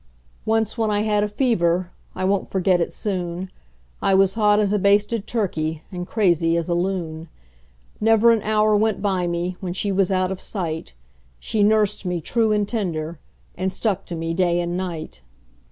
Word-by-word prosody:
Once 225 Hz, +1 st, 0 dB
when 220 Hz, -1 st, +1 dB
I 205 Hz, 0 st, +1 dB
had 210 Hz, -1 st, +1 dB
a -, -, +1 dB
fever 185 Hz, -7 st, +1 dB, 0.2 s
I 185 Hz, -, -2 dB
won't 195 Hz, 0 st, +1 dB
forget 185 Hz, -2 st, +2 dB
it -, -, -1 dB
soon 180 Hz, -2 st, -3 dB, 0.5 s
I 195 Hz, -, +3 dB
was 195 Hz, 0 st, +4 dB
hot 210 Hz, -2 st, +3 dB
as 205 Hz, -1 st, +1 dB
a 210 Hz, -, +2 dB
basted 205 Hz, +2 st, +2 dB
turkey 160 Hz, -8 st, -2 dB
and 180 Hz, -1 st, -5 dB
crazy 170 Hz, -6 st, +2 dB
as 170 Hz, -, -2 dB
a -, -, +2 dB
loon; 170 Hz, -3 st, -2 dB, 0.7 s
Never 225 Hz, +1 st, +5 dB
an 225 Hz, -2 st, +2 dB
hour 215 Hz, 0 st, +2 dB
went 215 Hz, -1 st, +1 dB
by 190 Hz, -3 st, 0 dB
me 175 Hz, +1 st, -2 dB
when 180 Hz, -2 st, -4 dB
she 200 Hz, +2 st, -1 dB
was 195 Hz, 0 st, +2 dB
out 185 Hz, 0 st, +1 dB
of 190 Hz, -, -5 dB
sight 160 Hz, -, -5 dB, 0.4 s
She 215 Hz, -, -1 dB
nursed 210 Hz, -1 st, +3 dB
me 180 Hz, -2 st, -2 dB
true 220 Hz, +7 st, +1 dB
and 210 Hz, -1 st, +1 dB
tender, 170 Hz, -8 st, -3 dB, 0.4 s
and 190 Hz, +1 st, -1 dB
stuck 195 Hz, 0 st, -1 dB
to 175 Hz, -, -5 dB
me 165 Hz, 0 st, -3 dB
day 175 Hz, -1 st, +2 dB
and 175 Hz, 0 st, -2 dB
night. 175 Hz, -, -5 dB
190 Hz, 185 wpm, -22 LUFS, 175-210 Hz, 0.7 s, Never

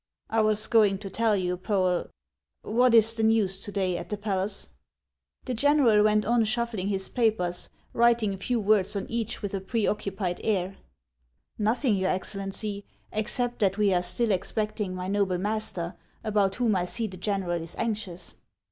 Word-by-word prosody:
" -, -, -48 dB
I 225 Hz, 0 st, +3 dB
was 215 Hz, 0 st, +2 dB
going 210 Hz, -4 st, +4 dB
to 195 Hz, -1 st, -8 dB
tell 225 Hz, +1 st, +2 dB
you, 180 Hz, -2 st, -1 dB
Poel 185 Hz, -2 st, 0 dB, 0.3 s
— 65 Hz, -, -63 dB, 0.2 s
What 240 Hz, +2 st, +3 dB
is 225 Hz, 0 st, +6 dB
the 225 Hz, -, -2 dB
news 215 Hz, -4 st, +2 dB
to 205 Hz, -, -6 dB
day 185 Hz, -3 st, 0 dB
at -, -, -8 dB
the 210 Hz, -, -2 dB
palace? 195 Hz, -, -3 dB, 0.4 s
" 65 Hz, 0 st, -43 dB
The 255 Hz, -, -2 dB
general 250 Hz, -4 st, +4 dB
went 215 Hz, 0 st, +3 dB
on 235 Hz, 0 st, +3 dB
shuffling 220 Hz, -3 st, -1 dB
his 195 Hz, -1 st, 0 dB
papers, 215 Hz, -7 st, 0 dB, 0.2 s
writing 235 Hz, -3 st, +3 dB
a -, -, -6 dB
few 235 Hz, +5 st, -1 dB
words 205 Hz, -1 st, +2 dB
on 200 Hz, -, -2 dB
each 230 Hz, -1 st, -3 dB
with 205 Hz, -, -3 dB
a 195 Hz, -, -2 dB
preoccupied 200 Hz, -3 st, -2 dB
air. 195 Hz, -3 st, -1 dB, 0.4 s
" -, -, -41 dB
Xothiug, 220 Hz, 0 st, +2 dB
your 190 Hz, 0 st, +1 dB
Excellency, 195 Hz, +2 st, -3 dB, 0.3 s
except 240 Hz, +3 st, -1 dB
that 195 Hz, -1 st, +2 dB
we 205 Hz, -2 st, +3 dB
are 175 Hz, -, +2 dB
still 210 Hz, +6 st, 0 dB
ex 185 Hz, -, -1 dB
pecting 210 Hz, -3 st, -2 dB
my 180 Hz, 0 st, -4 dB
noble 195 Hz, -2 st, +1 dB
master, 190 Hz, -3 st, -2 dB, 0.3 s
about 205 Hz, -3 st, +1 dB
whom 235 Hz, -4 st, +1 dB
I 180 Hz, -1 st, 0 dB
see 225 Hz, +5 st, -1 dB
the 190 Hz, -3 st, -6 dB
general 185 Hz, -3 st, -1 dB
is 165 Hz, 0 st, -7 dB
anxious." 205 Hz, -, -4 dB
205 Hz, 185 wpm, -27 LUFS, 185-220 Hz, 0.4 s, is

